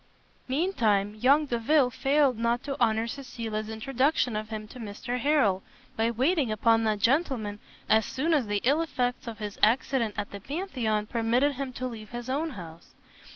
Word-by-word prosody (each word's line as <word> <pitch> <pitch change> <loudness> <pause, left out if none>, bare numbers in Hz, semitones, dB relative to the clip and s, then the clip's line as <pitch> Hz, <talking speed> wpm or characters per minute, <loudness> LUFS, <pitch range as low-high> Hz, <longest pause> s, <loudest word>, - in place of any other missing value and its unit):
Mean 320 +9 0
time 205 - +2
young 275 +8 +3
Delvile 250 +2 +2
failed 275 +1 +2
not 235 +1 0
to 280 -1 -3
honour 225 -1 +3
Cecilia's 230 -4 -5
introduction 255 +2 0
of 215 0 -4
him 215 -1 -5
to 255 - -11
Mr 230 +3 -4
Harrel, 240 -9 +2 0.3
by 225 +1 +1
waiting 260 +2 +1
upon 225 +1 +3
that 215 -1 +1
gentleman 230 - 0 0.3
as 220 0 +4
soon 305 +9 -1
as 275 -8 +2
the 205 -1 -1
ill 285 +6 +3
effects 250 -7 -2
of 225 -2 -5
his 210 -1 -6
accident 230 -1 +2
at 205 - -3
the 200 - -7
Pantheon 245 - -2
permitted 235 +5 +1
him 270 0 -4
to 255 - -4
leave 225 -4 -7
his 240 +1 -5
own 310 +5 -1
house. 170 -2 -11
235 Hz, 175 wpm, -28 LUFS, 215-275 Hz, 0.3 s, as